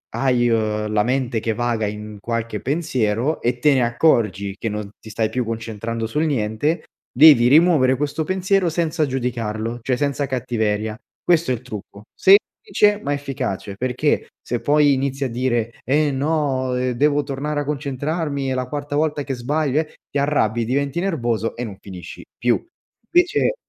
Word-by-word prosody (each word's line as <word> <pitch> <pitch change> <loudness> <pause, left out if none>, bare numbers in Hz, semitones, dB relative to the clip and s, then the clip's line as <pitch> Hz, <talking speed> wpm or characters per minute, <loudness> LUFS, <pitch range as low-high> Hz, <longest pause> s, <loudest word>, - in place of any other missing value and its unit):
hai, 125 -3 +2
uhm, 105 -1 0
la 105 -1 +3
mente 125 -2 0
che 115 -1 -1
vaga 115 -2 -1
in 105 0 -7
qualche 115 -2 -3
pensiero 130 -3 0
e 120 +1 0
te 150 +2 +4
ne 130 -2 +3
accorgi 110 -6 +1
che 115 - -2
non 105 -1 -4
ti 110 - -12
stai 110 0 -1
più 125 -1 -1
concentrando 115 0 -4
sul 150 +7 0
niente, 130 +3 0 0.3
devi 130 -3 +7
rimuovere 145 -4 +5
questo 150 +2 -1
pensiero 185 -1 +1
senza 160 -1 0
giudicarlo, 120 -3 -3
cioè 125 +1 0
senza 140 -1 -1
cattiveria, 110 -4 -1 0.3
questo 170 -4 +2
è - - +2
il 120 - -9
trucco, 105 -3 -9
semplice 205 +1 +3
ma 140 - -2
efficace, 130 -9 -4
perché 130 +5 0
se 120 - -3
poi 145 -1 +4
inizi 135 +1 -1
a - - -2
dire: 120 -1 -1
“Eh 145 +2 +2
no, 135 -3 0
ehm, 125 0 0
devo 145 +3 +2
tornare 145 +1 -3
a - - -5
concentrarmi, 145 0 -2
è - - 0
la 125 -1 -2
quarta 145 +1 -4
volta 150 -2 0
che 135 - -3
sbaglio, 145 +3 0
eh” 155 - -11
ti 145 - -3
arrabbi 120 -6 +1
diventi 140 +5 -1
nervoso 120 - -1
e 125 - -4
non 100 -3 -8
finisci 90 -3 -9
più, 120 - +1 0.5
invece 355 +7 +3
130 Hz, 165 wpm, -21 LUFS, 115-150 Hz, 0.5 s, devi